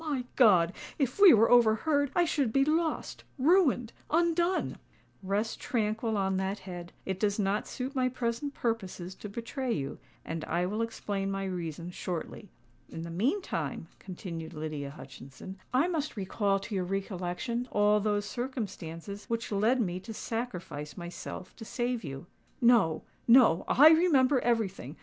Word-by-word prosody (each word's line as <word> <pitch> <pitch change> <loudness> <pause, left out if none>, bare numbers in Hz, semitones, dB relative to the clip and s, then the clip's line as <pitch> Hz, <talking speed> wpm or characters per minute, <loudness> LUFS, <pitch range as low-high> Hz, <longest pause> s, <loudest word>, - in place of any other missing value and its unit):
"My 285 -6 -2
God! 185 -8 +5 0.2
if 275 +5 -1
we 400 -3 +10
were 225 -1 +5
overheard! 245 +5 +4
I 350 - +4
should 280 -7 0
be 275 +3 +3
lost—ruined—undone!" 330 - +1 0.4
"Rest 205 +3 -1
tranquil 220 -1 -1
on 190 -1 +1
that 190 +2 -1
head:—it 185 0 -7
does 205 -1 +1
not 205 0 0
suit 260 +2 -5
my 255 -2 +1
present 250 +3 -3
purposes 190 -6 -3
to 210 - -9
betray 240 +4 -4
you—and 155 +1 -5
I 175 +2 0
will 210 +5 -2
explain 205 -3 -3
my 195 0 -2
reason 175 -2 -4
shortly. 180 +3 -5 0.4
In 165 - -6
the 170 - -6
meantime," 170 - -2
continued 170 -3 -7
Lydia 150 -2 -4
Hutchinson, 140 +6 -11
"I 265 +7 +3
must 310 -8 -2
recall 195 +1 0
to 210 - -7
your 190 -2 0
recollection 195 +5 -3
all 210 0 +4
those 205 0 0
circumstances 205 -7 -5
which 230 -1 -3
led 220 +6 +2
me 180 -5 -1
to 220 +3 -8
sacrifice 180 -13 -5
myself 175 +1 -7
to 225 - -8
save 240 +1 -2
you." 135 0 -7 0.3
"No—no: 230 -1 +4
I 300 +4 +8
remember 295 -5 +4
everything. 210 - -1
210 Hz, 140 wpm, -30 LUFS, 180-250 Hz, 0.4 s, we